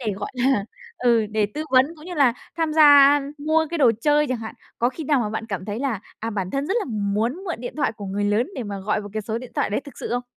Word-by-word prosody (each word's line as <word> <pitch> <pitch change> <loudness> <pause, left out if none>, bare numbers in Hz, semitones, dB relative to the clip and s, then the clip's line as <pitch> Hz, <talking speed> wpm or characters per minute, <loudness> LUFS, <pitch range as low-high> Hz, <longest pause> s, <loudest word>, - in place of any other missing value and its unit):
để, 220 -5 -2
gọi 205 - -5
là, 250 -4 +1 0.3
ừ, 235 -3 +3
để 215 -1 +1
tư 305 +1 -3
vấn 255 0 +5
cũng 305 - -14
như 360 - -6
là 275 -6 +4 0.2
tham 325 -2 0
gia, 315 0 +5
a, 285 0 +8 0.2
mua 315 +2 +1
cái 340 - -2
đồ 245 -5 +5
chơi 295 +2 +3
chẳng 255 -2 -1
hạn. 220 -1 -7 0.2
Có 240 - +3
khi 300 +4 -7
nào 280 -3 +2
mà 210 -2 -2
bạn 220 +1 -4
cảm 195 -4 -4
thấy 210 +2 -4
là, 260 -7 -2 0.2
à, 225 +1 -3
bản 195 -3 -3
thân 275 +5 -2
rất 385 - -1
là - - -2
muốn 215 +3 -1
mượn 345 - -2
điện 245 - -6
thoại 285 - 0
của 210 -2 -9
người 200 +2 -2
lớn 210 +4 +2
để 255 - -4
mà 200 -2 -5
gọi 210 +2 -1
vào 205 -1 -9
cái 215 -1 -3
số 220 +2 -3
điện 250 0 -10
thoại - - 0
đấy 210 - 0
thực 285 -3 -13
sự - - -5
không? 245 +1 -1
240 Hz, 295 wpm, -23 LUFS, 210-290 Hz, 0.3 s, a